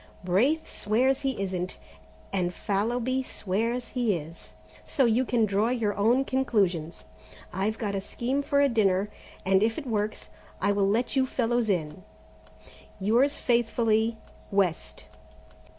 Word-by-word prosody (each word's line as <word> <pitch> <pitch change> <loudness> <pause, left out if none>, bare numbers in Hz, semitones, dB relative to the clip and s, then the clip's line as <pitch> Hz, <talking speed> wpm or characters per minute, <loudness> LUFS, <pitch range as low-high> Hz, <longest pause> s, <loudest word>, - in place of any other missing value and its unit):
Braith 240 - +2
swears 255 +6 +1
he 270 -5 -2
isn't, 185 -2 -3 0.6
and 180 -2 -1
Fallowby 235 +5 0
swears 230 +2 -2
he 240 -6 +1
is, 150 -9 -11 0.3
so 270 - +1
you 235 +2 +3
can 235 -3 +2
draw 205 +2 +1
your 225 -5 0
own 235 +6 +3
conclusions. 195 -12 0 0.5
I've 200 +4 -1
got 205 -3 -2
a 195 - -1
scheme 255 +7 -2
for 280 0 +2
a 285 - +5
dinner, 205 -4 +1 0.3
and 190 0 +4
if 225 +1 +1
it 315 - -5
works, 215 -3 -2 0.3
I 200 - +2
will 200 -1 +2
let 235 +6 0
you 260 -1 +3
fellows 240 -2 0
in. 175 -1 -1 1.0
"Yours 240 +9 +2
faithfully, 230 -2 +1 0.3
"West. 195 -4 -1
220 Hz, 135 wpm, -27 LUFS, 195-245 Hz, 1.0 s, a